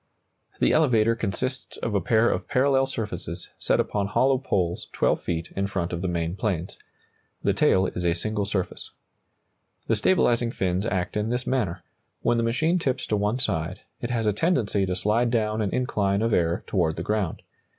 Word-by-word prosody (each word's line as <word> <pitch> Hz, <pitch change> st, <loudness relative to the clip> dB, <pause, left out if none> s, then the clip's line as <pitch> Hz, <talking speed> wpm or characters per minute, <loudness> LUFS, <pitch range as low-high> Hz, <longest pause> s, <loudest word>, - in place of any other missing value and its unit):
] -, -, -36 dB
The -, -, +3 dB
elevator 115 Hz, -7 st, +4 dB
consists 120 Hz, +4 st, -3 dB
of 115 Hz, -, -3 dB
a 100 Hz, -, +2 dB
pair 115 Hz, 0 st, +3 dB
of -, -, -3 dB
parallel 135 Hz, 0 st, +3 dB
surfaces 105 Hz, -9 st, -5 dB
set -, -, +1 dB
upon 100 Hz, -1 st, 0 dB
hollow 130 Hz, +5 st, +3 dB
poles 90 Hz, -9 st, -1 dB
12 -, -, +1 dB
feet 85 Hz, 0 st, -3 dB
in 100 Hz, 0 st, 0 dB
front 90 Hz, -3 st, -2 dB
of 85 Hz, -, -3 dB
the 95 Hz, -, -1 dB
main 85 Hz, 0 st, -1 dB
planes. 95 Hz, -3 st, -2 dB, 0.6 s
The -, -, +3 dB
tail 95 Hz, 0 st, +3 dB
is 90 Hz, -, -3 dB
a 85 Hz, -1 st, +2 dB
single 105 Hz, +3 st, -2 dB
surface. 95 Hz, -3 st, -3 dB, 1.0 s
The 115 Hz, -, +2 dB
stabilizing 120 Hz, -, +3 dB
fins 95 Hz, +3 st, 0 dB
act 95 Hz, -5 st, -2 dB
in 105 Hz, +1 st, 0 dB
this 125 Hz, +1 st, -1 dB
manner: 95 Hz, -10 st, -1 dB, 0.4 s
when 120 Hz, -, +3 dB
the 115 Hz, -, +1 dB
machine 155 Hz, +10 st, +1 dB
tips 130 Hz, -6 st, -1 dB
to 105 Hz, -, 0 dB
one 105 Hz, +3 st, 0 dB
side, 90 Hz, -7 st, -2 dB, 0.2 s
it 120 Hz, -, -3 dB
has 115 Hz, -2 st, 0 dB
a 105 Hz, -, +3 dB
tendency 105 Hz, -, +1 dB
to 90 Hz, -, -1 dB
slide 110 Hz, +5 st, +1 dB
down 110 Hz, -2 st, 0 dB
an 105 Hz, -, 0 dB
incline 105 Hz, -5 st, 0 dB
of 115 Hz, -1 st, +1 dB
air 85 Hz, 0 st, +1 dB
toward 85 Hz, -5 st, +1 dB
the 85 Hz, -, -4 dB
ground. 105 Hz, -5 st, -1 dB
105 Hz, 190 wpm, -25 LUFS, 90-120 Hz, 1.0 s, elevator